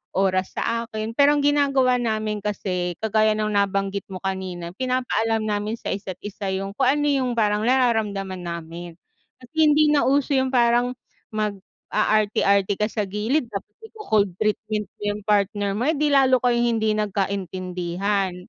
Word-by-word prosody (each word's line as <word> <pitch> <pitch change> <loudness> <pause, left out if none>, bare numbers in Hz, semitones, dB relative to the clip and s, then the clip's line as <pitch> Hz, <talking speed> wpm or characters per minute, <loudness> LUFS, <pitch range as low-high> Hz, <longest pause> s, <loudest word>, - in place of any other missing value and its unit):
oras 185 -1 +1
sa 230 0 -1
akin. 220 -1 -4
Pero 285 +2 +5
ang 290 - 0
ginagawa 275 -3 +3
namin 215 -2 -1
kasi, 180 -4 -2
kagaya 215 0 +3
ng 215 0 -1
nabanggit 200 -1 0
mo 185 - -5
kanina, 185 -3 -4
pinapaalam 245 -3 0
namin 210 +1 -1
sa - - -8
isa't 190 -2 -5
isa 205 -1 -5
yung 195 +1 -3
kung 265 - +3
ano 295 0 0
yung 260 -3 +1
parang 210 -2 +1
nararamdaman 215 -7 +1
namin. 170 0 -7 0.4
Kasi 255 +5 -18
hindi 300 +1 +5
na 295 -1 +3
uso 280 +1 +2
yung 260 -1 +1
parang 240 0 +3 0.4
mag-aarte-arte 205 -1 0
ka 210 +2 -1
sa 210 -3 -2
gilid 220 +8 -1
tapos 205 -3 -7 0.2
ico-cold 215 - 0
treatment 215 +1 -1 0.2
mo - - -24
yung 210 - -9
partner 205 -1 +1
mo, 245 - 0
eh 320 - +2
di 295 0 +1
lalo 260 -3 +4
kayong 240 -1 +2
hindi 220 -1 +1
nagkaintindihan. 190 -2 -2
215 Hz, 155 wpm, -23 LUFS, 195-245 Hz, 0.4 s, Pero